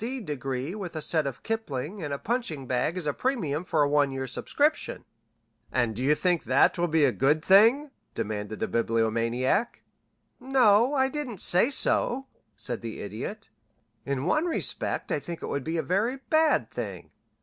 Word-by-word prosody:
D. 260 +3 -3
degree 135 - -4
with 190 -5 -6
a 155 - -3
set 155 -3 +1
of 135 - -6
Kipling 195 - -4
and 150 -3 -4
a 140 - -1
punching 210 - -3
bag 130 +8 -1
as 180 - -4
a 145 - 0
premium 175 - -1
for 160 -4 +1
a - - +2
one 145 -1 +3
year's 130 -1 -4
subscription." 295 - 0 0.7
"And 120 -3 0
you 140 +4 +3
think 175 0 +1
that 130 +1 +4
will 175 - +2
be 160 -2 +3
a 135 - +3
good 150 +5 +1
thing?" 230 +10 +5 0.2
demanded 105 0 -4
the - - -1
Bibliomaniac. 115 - 0 0.6
"No, 250 -1 +4
I 265 -1 +3
didn't 265 -5 -4
say 180 +7 +4
so," 270 -1 +1 0.3
said 120 -3 -3
the 115 -1 -6
Idiot. 120 - -6 0.5
"In 140 +1 -2
one 305 - +2
respect 340 - -1
I - - +1
think 170 -1 -7
it - - -3
would 140 - -2
be 165 +4 -2
a 160 - 0
very 215 +9 0
bad 315 0 +3
thing. - - -6
160 Hz, 175 wpm, -27 LUFS, -, 0.7 s, thing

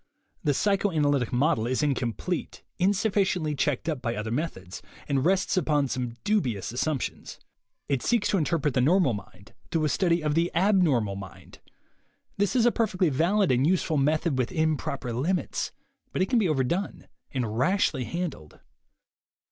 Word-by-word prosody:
The 145 -2 +2
psychoanalytic 155 - +1
method 125 -2 +1
is 130 +4 0
incomplete, 140 +5 -2 0.2
insuf 200 +3 +2
ficiently 180 -6 +1
checked 140 +1 -1
up 150 -6 -2
by 115 0 -2
other 105 +1 -4
methods, 115 - -4 0.3
and 135 -2 +1
rests 190 +3 +1
upon 145 -5 +1
some 125 -2 -3
dubious 130 - 0
assumptions. 135 +2 -3 0.5
It 140 -3 0
seeks 235 -4 +1
to 195 - +2
interpret 150 -3 0
the 125 - +2
normal 155 -1 +3
mind 100 0 -10 0.2
through 160 -2 0
a - - +1
study 170 0 +1
of 150 -1 +1
the 165 +2 +2
abnormal 165 - +2
mind. 95 -2 -11 0.8
This 205 +4 +1
is 240 -2 +4
a 240 - +5
perfectly 190 -7 +1
valid 175 +7 +2
and 130 +3 +3
useful 170 -3 +1
method 150 0 +1
within 155 +5 +1
proper 135 -3 -4
limits, 165 +10 -1 0.4
but 185 - +1
it 190 - -3
can 245 - +4
be 195 -6 +2
overdone 155 +7 -1 0.2
and 115 -5 -2
rashly 160 -6 +1
handled. 165 - -5
155 Hz, 155 wpm, -27 LUFS, 130-185 Hz, 0.8 s, a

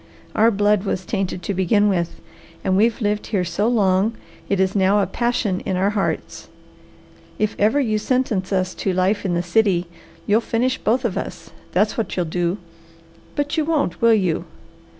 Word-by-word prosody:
Our 225 +2 +4
blood 205 -2 +2
was 190 -2 -2
tainted 185 -2 -3
to 200 - -2
begin 195 +3 +2
with, 175 -4 -1 0.4
and 185 - +1
we've 225 +4 +2
lived 210 0 -1
here 190 -4 0
so 180 +5 0
long 210 -1 +2 0.3
it 200 - +1
is 190 +1 +1
now 195 +1 +3
a 200 - +2
passion 235 -6 -1
in 190 -2 -2
our 195 +2 +2
hearts. 205 -2 -3 0.9
If 215 0 0
ever 220 +8 +3
you 220 -6 +1
sentence 220 -5 0
us 185 -1 0
to 190 - -2
life 190 +3 +1
in 175 -2 0
the 170 - 0
city, 180 -1 +2 0.4
you'll 215 +3 +3
finish 250 +3 0
both 245 +3 +1
of 210 - -1
us, - - -8 0.2
that's 210 +5 +1
what 225 - -3
you'll 180 - +1
do! 175 +3 -1 0.8
But 290 +2 -1
you 315 - +2
won't, 300 - 0
will 230 -1 +6
you? 185 -6 0
205 Hz, 180 wpm, -21 LUFS, 185-225 Hz, 0.9 s, will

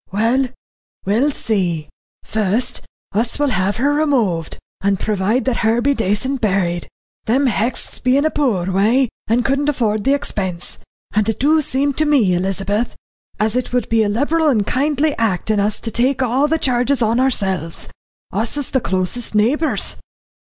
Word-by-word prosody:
"Well 230 +7 +2 0.6
we'll 225 +9 +2
see. 180 - -1 0.4
Fust 215 +2 -1 0.3
us 225 +4 0
will 290 -1 +1
have 190 0 0
her 280 +4 +1
removed, 240 - 0 0.2
and 195 -1 +1
provide 215 +4 0
that 260 -3 0
her 225 +1 +2
be 280 +4 +2
daycent 240 +4 -1
buried. 185 -5 0 0.4
Them 260 +5 +2
Hexts 235 0 -1
be 255 +2 +3
in 285 - +2
a 315 - +2
poor 200 -11 0
way, 225 +7 +3 0.2
and 235 +2 +1
couldn't 275 +2 +1
afford 215 -7 0
the 275 +4 +3
expense, 185 -10 -3 0.3
and 215 +1 +1
it 225 - -2
do 310 +4 +4
seem 280 0 0
to 310 - +1
me, 260 -11 +3
Elizabeth, 195 +5 -1 0.4
as 215 +1 +1
it 250 -1 -2
would 250 -3 0
be 225 -1 +3
a 210 - +1
liberal 300 +8 +1
and 230 -7 +3
a - - 0
kindly 290 +5 +1
act 220 -2 0
in 210 - +1
us 205 +1 0
to 225 - -4
take 255 +4 +1
all 255 +4 +2
the 320 +2 +1
charges 255 -2 +1
on 225 +2 +2
ourselves. 190 - 0 0.5
Us 225 +8 -2
is 290 - -3
the 260 - +1
closest 190 +4 -2
neighbours." 265 +10 +1
230 Hz, 170 wpm, -19 LUFS, 200-270 Hz, 0.6 s, do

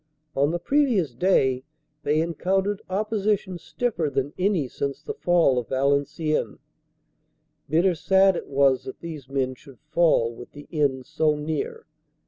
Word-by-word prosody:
On 140 +2 +3
the 170 - -1
previous 220 - +1
day 130 -4 +2 0.4
they 150 +2 +1
encountered 190 +4 0
opposition 205 -2 -1
stiffer 180 -5 -2
than 140 +1 -2
any 180 -7 +1
since 140 +2 -4
the 440 - -6
fall 175 - +3
of 120 - -6
Valenciennes. 140 +3 0 1.1
Bitter 170 +5 +3
sad 190 +3 +4
it - - -5
was 135 -2 +2
that 130 - -8
these 155 -6 -8
men 135 -1 -1
should 130 0 -16
fall 155 -9 +3
with 120 - -12
the 145 0 -11
end 140 -5 0
so 155 +2 +1
near. 150 0 -4
155 Hz, 140 wpm, -25 LUFS, 135-185 Hz, 1.1 s, sad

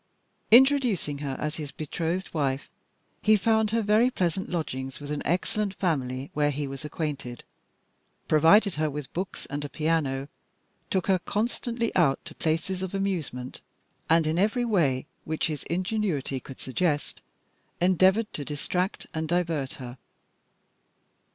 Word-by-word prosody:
Introducing 240 - +5
her 140 -2 -3
as 150 0 -2
his 150 -3 -5
betrothed 165 +5 -3
wife, 140 -3 -1 0.5
he 215 0 +5
found 220 +1 +2
her 225 +1 +1
very 215 +4 +4
pleasant 185 -5 -1
lodgings 135 -6 -3
with 145 0 -7
an 150 - -2
excellent 195 +4 0
family, 135 -6 -1
where 145 0 +2
he 145 0 -2
was 135 +1 -6
acquainted, 145 -5 -4 0.8
provided 165 +6 +5
her 155 - +2
with 145 -1 -6
books 185 +2 -4
and 145 +1 -4
a 145 - -5
piano, 150 -4 0 0.6
took 190 -2 +1
her 190 -2 +3
constantly 230 +4 -2
out 145 -7 +4
to 170 - -7
places 165 +4 -1
of 190 +1 -3
amusement, 165 -10 -3 0.5
and, 165 0 +5
in 160 +2 +1
every 220 +5 +2
way 150 - +2 0.2
which 160 0 -1
his 150 -3 -2
ingenuity 180 -7 -1
could 130 +1 -11
suggest, 145 +3 -1 0.6
endeavoured 190 +4 +3
to 145 - -4
distract 180 +6 -2
and 160 0 -2
divert 165 -5 0
her. 125 -1 -9
165 Hz, 140 wpm, -27 LUFS, 145-195 Hz, 0.8 s, Introducing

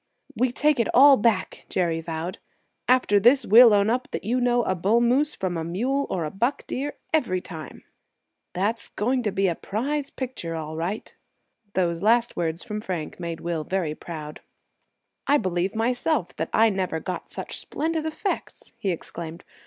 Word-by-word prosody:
"We 255 -1 +1
take 295 +1 +2
it 230 - +2
all 275 +2 +9
back," 230 -2 0
Jerry 165 -3 0
vowed. 165 +2 -5 0.5
"After 250 -5 +4
this, 245 +5 +5
we'll 230 +3 +8
own 205 0 +4
up 255 +4 -1
that - - -5
you 245 +4 0
know 245 -1 +3
a 185 - 0
bull 195 +6 +2
moose 260 +6 +2
from 180 -2 -2
a 165 - -2
mule 250 +12 -1
or 175 -4 -1
a 150 - -4
buck 240 +8 -1
deer 285 +3 -3 0.2
every 235 -13 +2
time." 160 -5 -9 0.7
"That's 210 +5 -1
going 250 +4 0
to 215 -4 -1
be 195 0 +1
a 175 - +1
prize 275 - -3
picture, 245 -11 -5
all 155 -1 -5
right!" 175 +6 -4 0.6
Those 170 -2 0
last 230 +3 +3
words 165 -1 -1
from 210 0 -5
Frank 180 -7 -5
made 170 -2 -5
Will 170 -2 -2
very 175 -3 -1
proud. 155 -2 -8 0.9
"I 290 - +5
believe 185 -2 -1
myself 245 - 0
that 160 - -2
I 225 0 +5
never 185 -4 -2
got 180 +3 -5
such - - -5
splendid 320 0 -2
effects!" 315 +5 -4
he 195 - -1
exclaimed. 170 -1 -6
205 Hz, 175 wpm, -25 LUFS, 170-250 Hz, 0.9 s, all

